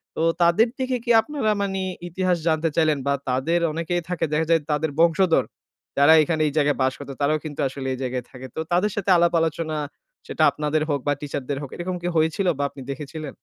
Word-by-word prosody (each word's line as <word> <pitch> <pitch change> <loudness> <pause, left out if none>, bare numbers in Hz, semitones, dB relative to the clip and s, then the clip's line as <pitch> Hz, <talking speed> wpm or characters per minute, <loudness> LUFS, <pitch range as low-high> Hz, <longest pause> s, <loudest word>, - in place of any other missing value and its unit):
তো - - -2 0.2
তাদের 170 +7 +5
দেখে 260 -1 0
কি 240 - +2
আপনারা 280 -7 -1
মানে 195 -1 -1 0.3
ইতিহাস 180 0 0
জানতে 160 0 +2
চাইলেন? 155 -2 +3
বা 140 - +3 0.2
তাদের 135 +7 +1
অনেকেই 170 +2 -2
থাকে 175 -2 0
দেখা 160 +1 +1
যায় 165 -2 +4
তাদের 150 +1 0
বংশধর 170 +1 +4 0.5
যারা 145 +3 +7
এখানে 155 +1 -1
এই 145 - -3
জায়গায় 145 -1 +2
বাস 130 0 +2
করতো 140 -1 -7
তারাও 150 +2 +2
কিন্তু 150 0 -7
আসলে 135 0 -6
এই 130 - -6
জায়গায় 125 -1 -3
থাকে। 130 0 -9
তো - - -4
তাদের 185 +5 +2
সাথে 200 -1 -2
আলাপ-আলোচনা 165 -2 +1 0.5
সেটা - - 0
আপনাদের 150 +1 -1
হোক 140 -1 +1
বা 145 - +3
টিচার 145 -2 -4
দের 140 -1 -1
হোক 140 - -6
এরকম 180 +1 -4
কি 175 - -3
হয়েছিল? 160 +4 +1
বা 145 - -1
আপনি 135 - -12
দেখেছিলেন? 150 +1 -7
160 Hz, 205 wpm, -23 LUFS, 145-175 Hz, 0.5 s, যারা